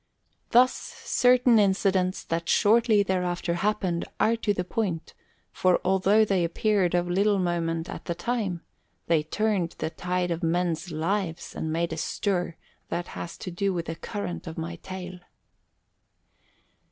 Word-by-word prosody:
Thus 250 +2 +5
certain 250 -2 +3
incidents 190 -2 +2
that 165 0 -3
shortly 220 -1 +4
thereafter 180 -2 -1
happened 185 -2 0 0.2
are 230 - +3
to 225 -2 0
the 180 -3 -1
point, 180 -4 -3 0.4
for 185 -1 +2
although 190 +3 +4
they 195 -4 +1
appeared 180 +1 +1
of 175 0 +1
little 200 +3 +2
moment 170 -2 -1
at - - -7
the 170 - -2
time, 190 -2 -2 0.4
they 165 -2 +3
turned 185 +1 -1
the 160 - -3
tide 180 0 -2
of 170 +1 -2
men's 170 0 0
lives 170 +2 -2
and 160 - -3
made 165 +1 -1
a - - -5
stir 180 -1 -1 0.3
that 175 0 -3
has 170 - -7
to 185 - -6
do 190 +2 -1
with 170 -1 -2
the 165 - -4
current 180 0 -5
of 160 - -7
my 170 +1 -4
tale. 185 0 -8
180 Hz, 150 wpm, -26 LUFS, 170-205 Hz, 0.4 s, Thus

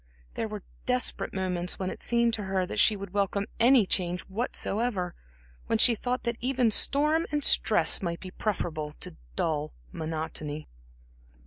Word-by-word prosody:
There 225 - -3
were 210 -3 -7 0.2
desperate 250 0 0
moments 180 -2 -2
when 185 -1 -3
it - - -9
seemed 235 -1 +2
to 210 -3 -1
her 190 -1 0
that - - -4
she 215 - +5
would 200 -2 -8
welcome 200 0 0
any 240 -2 +6
change 180 -1 0
whatsoever, 205 -2 -2 0.5
when 225 - +2
she 235 +2 +8
thought 250 +3 -3
that 235 -1 -2
even 250 -2 +1
storm 300 +8 +3
and 295 -1 -1
stress 170 - +4
might 170 -2 -3
be 185 - -9
preferable 160 -8 -3
to - - -7 0.2
dull 155 - -1 0.2
monotony. 155 -1 -4
200 Hz, 155 wpm, -28 LUFS, 175-235 Hz, 0.5 s, she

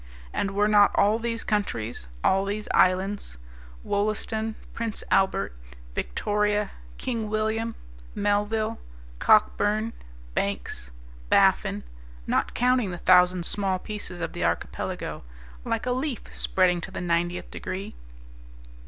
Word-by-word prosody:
And 195 0 -1
were 205 +1 +4
not 205 -1 +6
all 210 +3 +4
these 230 -1 -2
countries, 120 - -2 0.2
all 195 +1 +4
these 205 +1 -3
islands 185 - +2 0.5
Wollaston, 215 +2 -1 0.2
Prince 230 -2 -3
Albert, 190 - +2 0.4
Victoria, 210 - 0 0.3
King 225 -4 -2
William, 220 +1 -1 0.4
Melville, 210 +2 0 0.4
Cockburne, 215 +1 +3 0.4
Banks, - - -2 0.4
Baffin, - - +3 0.4
not - - 0
counting 250 -3 +3
the 175 - -4
thousand 180 0 +5
small 195 -1 0
pieces 185 -3 -5
of 165 - -3
the - - -3
archipelago 85 0 -2 0.4
like 230 -1 -1
a 250 - 0
leaf 255 -1 -3
spreading 180 -2 +2
to - - -6
the 190 - -6
90th 175 0 -1
degree? 195 +3 -5
205 Hz, 115 wpm, -26 LUFS, 185-220 Hz, 0.5 s, not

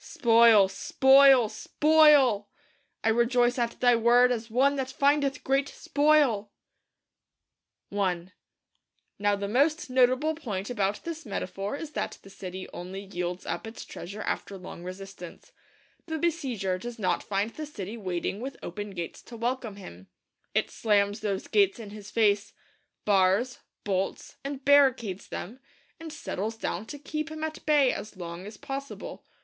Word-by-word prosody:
Spoil; 230 -4 +5
spoil; 265 +4 +5
SPOIL! 275 -2 +4 0.5
'I 225 - +3
rejoice 240 +2 +2
at 235 -1 -2
Thy 245 -1 +5
Word 240 +2 +5
as 230 -1 -3
one 270 +5 +3
that 265 -1 -2
findeth 280 +1 +1
great 275 +1 +1
spoil!' 290 -10 +2 1.4
I 185 -3 -1 0.9
Now 205 0 +2
the 200 0 -4
most 290 +6 +1
notable 255 +4 +3
point 215 -9 -5
about 205 -3 -1
this 330 -1 -6
metaphor 195 +1 -4
is 300 +1 -7
that - - -4
the 195 - -14
city 185 -1 -7
only 185 +2 -7
yields 180 -2 -5
up - - -4
its 225 - -9
treasure 200 +5 -8
after 200 - -3
long 180 -1 -10
resistance. 185 -1 -9 0.6
The 320 -1 -2
besieger 260 - -1
does 240 +3 -7
not 185 -5 0
find 205 +2 -2
the 305 +3 -7
city 210 -6 -7
waiting 190 -2 -3
with 265 +3 -6
open 205 +2 -6
gates 170 -2 -6
to 235 - -11
welcome 235 -2 -2
him. 95 - -12 0.5
It - - +1
slams 205 -1 +1
those 200 -3 -3
gates 200 -2 +3
in 215 -3 -9
his 210 -1 -10
face; 205 -2 +2 0.5
bars, 200 +5 +2 0.2
bolts, 195 -1 -3
and 275 -1 -6
barricades 260 -9 +3
them; 230 +8 -7 0.4
and 325 -1 -8
settles 225 -8 -4
down 215 -1 -4
to 290 - -7
keep 305 +2 -4
him 315 0 -6
at 315 0 -5
bay 290 -4 +4
as 210 -2 -7
long 175 +1 -7
as 210 0 -10
possible. 275 +4 -7
225 Hz, 150 wpm, -27 LUFS, 195-270 Hz, 1.4 s, Spoil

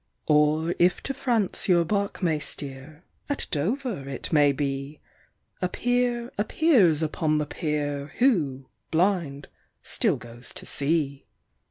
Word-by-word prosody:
Or, 155 +2 +3
if 175 +1 +3
to 275 - -2
France 230 -8 0
your 170 -2 +5
bark 200 +1 -1
may 160 -3 +2
steer, 145 +2 -5 0.3
at 285 - -2
Dover 190 - -2
it 135 +4 -5
may 145 -2 +5
be, 140 +1 -3 0.6
A 180 - +1
peer 245 +2 0
appears 205 - +3
upon 155 0 0
the 150 - 0
pier, 145 -2 -3
who, 155 - +2 0.2
blind, 165 -5 0 0.4
still - - +1
goes 120 +1 -9
to - - -8
sea. 140 -1 0
155 Hz, 130 wpm, -26 LUFS, 145-200 Hz, 0.6 s, your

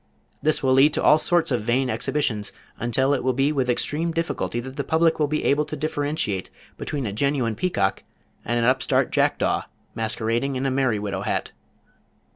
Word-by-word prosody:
This 155 -1 +1
will 130 -1 +3
lead 140 +3 +5
to - - -1
all 150 - +6
sorts 170 -1 +2
of 120 -3 +1
vain 125 +4 +1
exhibitions 125 -5 -1 0.3
until 130 +4 +1
it 135 - -1
will 130 0 +1
be 135 +4 +2
with 135 -4 0
extreme 155 +7 0
difficulty 165 -7 -2
that 130 +2 -7
the 140 - -2
public 160 +3 +2
will 150 - +2
be 155 +1 -1
able 145 +2 +2
to 155 - -5
differentiate 145 -9 -2 0.3
between 140 -3 -4
a 100 - -3
genuine 130 -1 0
peacock 105 - 0 0.4
and 120 - -1
an 120 - +1
upstart 130 +1 +2
jack - - +2
daw, - - 0 0.3
masquerading 115 +4 -1
in 130 +1 -2
a 135 - +1
merry 130 -4 +1
widow 100 -2 -3
hat. - - -2
135 Hz, 190 wpm, -23 LUFS, 120-150 Hz, 0.4 s, all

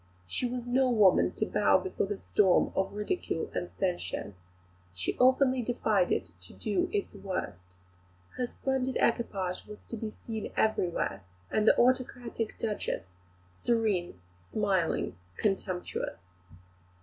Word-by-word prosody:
She 245 - -1
was 245 0 -4
no 255 +1 +3
woman 210 -6 +5
to - - 0
bow - - +4
before 380 - -2
the 205 0 -3
storm 190 -3 +3
of 190 0 +1
ridicule 210 - -2
and 175 - -2
censure. 175 - -2 0.6
She 90 -1 -1
openly 260 0 +5
defied 220 -6 +1
it 90 - 0
to 90 - -10
do 215 - 0
its 410 -2 -1
worst. 90 - -5 0.6
Her 250 - -2
splendid 265 0 -1
equipage 195 -6 0
was 210 0 -11
to 230 - -4
be 220 0 -3
seen 220 -2 -5
everywhere, 180 - +1 0.3
with 215 - +2
the - - +7
autocratic 245 -2 +1
Duchess, 210 - -2 0.6
serene, 210 - +1 0.2
smiling, 185 - 0 0.2
contemptuous. 190 -3 -1
210 Hz, 125 wpm, -30 LUFS, 185-245 Hz, 0.6 s, the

